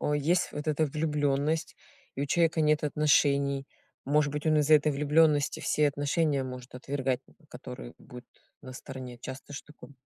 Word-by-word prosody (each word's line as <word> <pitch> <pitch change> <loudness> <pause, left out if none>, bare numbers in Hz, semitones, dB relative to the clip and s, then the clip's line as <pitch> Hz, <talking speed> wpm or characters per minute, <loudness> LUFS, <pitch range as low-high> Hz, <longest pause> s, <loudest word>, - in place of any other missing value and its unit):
э, 150 - 0
есть 170 +5 +1
вот 150 +1 -6
эта 155 0 +1
влюбленность, 150 +1 -1 0.4
и 140 - -1
у - - +1
человека 165 +1 +2
нет 150 0 +2
отношений. 140 -2 +2 0.4
Может 145 0 +2
быть, 150 +1 -4
он 155 -1 +4
из-за 150 +1 +3
этой 150 0 +5
влюбленности 150 0 +2
все 150 -1 +2
отношения 145 0 0
может 125 0 -9
отвергать, 135 0 -2
н - - -22 0.2
которые - - -9
будут 125 0 -12 0.4
на 130 - -9
стороне? 125 -2 -9
Часто 130 +3 -9
ж 135 - -5
таком 150 -1 -15
145 Hz, 165 wpm, -29 LUFS, 135-150 Hz, 0.4 s, этой